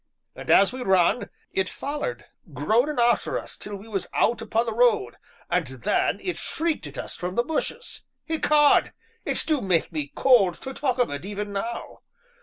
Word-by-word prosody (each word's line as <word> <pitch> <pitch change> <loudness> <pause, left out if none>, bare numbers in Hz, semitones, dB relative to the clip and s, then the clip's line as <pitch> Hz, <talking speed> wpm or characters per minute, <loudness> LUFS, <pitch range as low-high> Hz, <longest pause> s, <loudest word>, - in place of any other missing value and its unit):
And - - -9
as 200 +4 +5
we 255 - -6
run, 190 +1 +2 0.2
it 190 - 0
follered, 295 - -4 0.3
groanin' 250 +7 +1
arter 240 0 +2
us - - -6
till 205 0 -6
we 200 +3 -11
was 200 -4 -3
out 235 - +2
upon 225 +1 0
the 225 - -2
road, 245 - +2 0.3
and - - 0
then - - 0
it 360 - -2
shrieked 325 -1 -2
at - - -10
us - - -5
from 180 +1 -4
the 240 - +2
bushes. 320 - -3 0.3
Ecod! 300 -2 +4 0.3
it - - +1
do 305 -4 +1
make 180 -4 +1
me 150 -3 -4
cold 200 -10 +4
to 265 - -5
talk 265 -3 -1
of 245 - +1
it, 145 +2 -5
even 205 +1 -5
now. 230 +4 -5
235 Hz, 180 wpm, -25 LUFS, 195-285 Hz, 0.3 s, as